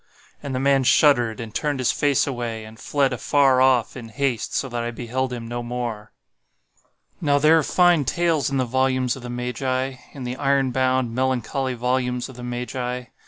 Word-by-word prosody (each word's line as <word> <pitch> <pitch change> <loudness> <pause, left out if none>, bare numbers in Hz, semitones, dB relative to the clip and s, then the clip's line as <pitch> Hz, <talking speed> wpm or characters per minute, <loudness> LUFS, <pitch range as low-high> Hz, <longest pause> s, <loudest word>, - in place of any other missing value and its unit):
And 140 -3 -4
the - - -1
man 135 0 +3
shuddered, 120 -4 +4
and 115 -3 -7
turned 145 +1 -1
his 130 -2 +1
face 145 -2 +2
away, 120 -4 -4
and 110 +1 -13
fled 140 -3 0
afar 135 +1 +3
off, 130 -3 +3
in 120 -3 -8
haste, 125 0 -2
so 135 - 0
that 120 -2 -3
I 120 - -2
beheld 125 +2 -3
him 120 -2 -6
no 120 +1 -4
more." 120 -3 -5 1.1
Now 145 -3 +3
there 155 +3 +5
are - - +2
fine 175 0 +3
tales 165 +1 +1
in 135 - -1
the 130 - +1
volumes 130 0 +1
of 135 - -10
the 120 - -7
Magi—in 130 +2 -4
the 125 +1 -4
iron 135 -2 +1
bound, 130 -2 +1
melancholy 130 +1 -1
volumes 125 0 -1
of 130 - -11
the 125 - -9
Magi. 125 +1 -4
130 Hz, 185 wpm, -23 LUFS, 120-135 Hz, 1.1 s, there